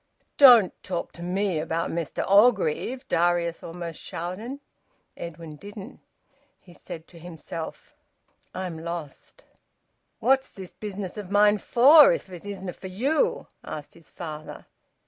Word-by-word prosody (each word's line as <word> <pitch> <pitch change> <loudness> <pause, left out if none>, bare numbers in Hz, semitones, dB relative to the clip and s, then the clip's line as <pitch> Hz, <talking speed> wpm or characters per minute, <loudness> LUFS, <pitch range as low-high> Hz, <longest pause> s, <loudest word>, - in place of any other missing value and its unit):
"Don't 240 -9 +8
talk 175 -2 -4
to 170 - -13
me 185 -1 -1
about 165 +1 -2
Mester 165 -2 -3
Orgreave!" 215 - +3
Darius 170 0 +1
almost 170 -1 -7
shouted. 210 +11 -5 0.6
Edwin 165 -2 -8
didn't. 200 +2 -10 0.6
He 175 - -17
said 160 -1 -9
to 170 - -14
himself: 165 -1 -8 0.6
"I 185 - -4
am 165 -3 -6
lost." 165 -3 -8 0.7
"What's 265 +3 +2
this 190 -2 -10
business 205 -1 -6
o' - - -4
mine 205 +2 +4
for, 290 - +7
if 345 - -5
it 180 +2 -9
isna' 190 -3 -6
for 190 - -9
you?" 255 +12 0 0.2
asked 150 -1 -8
his 170 - -17
father. 155 -2 -8
180 Hz, 130 wpm, -25 LUFS, 170-210 Hz, 0.7 s, Don't